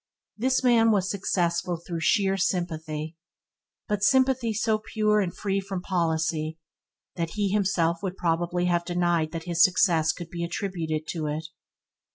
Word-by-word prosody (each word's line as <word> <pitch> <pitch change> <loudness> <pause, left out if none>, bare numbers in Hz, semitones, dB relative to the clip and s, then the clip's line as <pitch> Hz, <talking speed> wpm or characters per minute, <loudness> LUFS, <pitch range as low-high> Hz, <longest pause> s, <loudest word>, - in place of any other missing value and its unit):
This 260 +4 +1
man 235 -2 +5
was 195 -3 +2
successful 175 -3 0
through 170 0 -6
sheer 195 +4 +2
sympathy, 160 -4 -2 0.7
but 210 -2 -1
sympathy 260 -1 +3
so 220 0 +1
pure 215 -1 +1
and 190 -4 0
free 195 +1 -2
from 190 -2 -5
policy, 160 -3 -1 0.6
that 165 +1 -3
he 205 -2 0
himself 185 -4 +1
would 190 -2 -4
probably 175 +1 0
have 175 -1 +1
denied 175 -2 0
that 165 -1 -5
his 170 -1 0
success 165 -3 +4
could 170 -1 -9
be 170 -1 -4
attributed 170 -3 -3
to 160 -3 -3
it. 155 +2 -3
175 Hz, 150 wpm, -26 LUFS, 165-200 Hz, 0.7 s, man